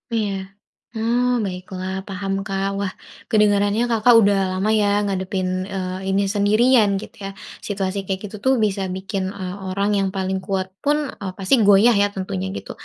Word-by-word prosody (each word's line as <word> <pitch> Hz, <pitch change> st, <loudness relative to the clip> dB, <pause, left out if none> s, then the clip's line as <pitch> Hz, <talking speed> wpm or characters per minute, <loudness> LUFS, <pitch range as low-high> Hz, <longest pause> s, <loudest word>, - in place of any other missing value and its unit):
Iya, 210 Hz, -3 st, 0 dB, 0.6 s
oh, 240 Hz, +3 st, +1 dB, 0.2 s
baiklah, 185 Hz, 0 st, -5 dB, 0.2 s
paham, 195 Hz, 0 st, -3 dB
Kak. 195 Hz, 0 st, -1 dB
Wah, 195 Hz, -2 st, -2 dB, 0.4 s
kedengarannya 205 Hz, +1 st, +3 dB
Kakak 230 Hz, +2 st, +5 dB
udah 200 Hz, -2 st, +4 dB
lama 190 Hz, +3 st, -1 dB
ya, 205 Hz, -, +2 dB, 0.2 s
ngadepin, 190 Hz, -1 st, -2 dB, 0.3 s
eee, 190 Hz, 0 st, -3 dB
ini 195 Hz, +1 st, +2 dB
sendirian, 215 Hz, +2 st, +4 dB
gitu, -, -, -11 dB
ya. 195 Hz, -, -4 dB, 0.4 s
Situasi 195 Hz, -1 st, -2 dB
kayak 190 Hz, 0 st, -2 dB
gitu 210 Hz, -, -10 dB
tuh, 265 Hz, -, +5 dB
bisa 200 Hz, -1 st, -1 dB
bikin, 190 Hz, 0 st, -3 dB
eee, 185 Hz, -1 st, -6 dB, 0.2 s
orang 200 Hz, +2 st, 0 dB
yang 195 Hz, -1 st, +1 dB
paling 190 Hz, 0 st, -1 dB
kuat 190 Hz, -2 st, -1 dB, 0.2 s
pun, 290 Hz, +1 st, +3 dB, 0.2 s
eee, 190 Hz, -2 st, -3 dB
pasti 195 Hz, +7 st, 0 dB
goyah 205 Hz, +3 st, +6 dB
ya, 205 Hz, -, +4 dB
tentunya, 95 Hz, -, -3 dB
gitu. -, -, -8 dB
195 Hz, 165 wpm, -21 LUFS, 190-210 Hz, 0.6 s, goyah